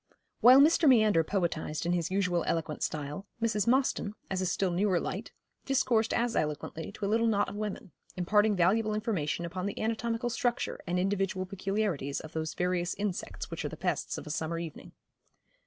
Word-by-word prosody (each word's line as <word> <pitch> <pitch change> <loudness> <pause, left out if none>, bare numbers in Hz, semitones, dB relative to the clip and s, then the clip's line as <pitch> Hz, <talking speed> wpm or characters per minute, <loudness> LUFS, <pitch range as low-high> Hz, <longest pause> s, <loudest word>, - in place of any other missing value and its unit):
While 255 +3 +8
Mr. 315 0 +5
Meander 215 -9 +5
poetised 165 -3 -2
in 175 - +1
his 170 -2 0
usual 180 -3 +1
eloquent 155 -2 -2
style, 150 +6 -3
Mrs. 220 -3 0
Mostyn, 250 -4 +1 0.2
as 190 -1 0
a 185 - 0
still 185 +1 0
newer 185 0 +2
light, - - -4 0.3
discoursed 245 -5 +2
as 235 0 0
eloquently 155 +2 -2
to 205 - -4
little 225 +3 +2
a - - +4
knot 205 -2 +1
of - - -8
women, 210 -2 -5 0.3
imparting 205 +4 +3
valuable 210 +4 +2
information 185 - -1
upon 185 +3 -4
the 205 - -5
anatomical 230 +2 -1
structure 240 0 -1
and 175 +1 0
individual 190 0 0
peculiarities 195 -7 -2
of 155 - -10
those 160 0 -3
various 180 0 0
insects 200 -2 -4
which - - -4
are - - -2
the - - -8
pests - - -2
of - - -7
a 150 - -5
summer 160 +2 -2
evening. 165 -3 -7
195 Hz, 180 wpm, -30 LUFS, 170-220 Hz, 0.3 s, While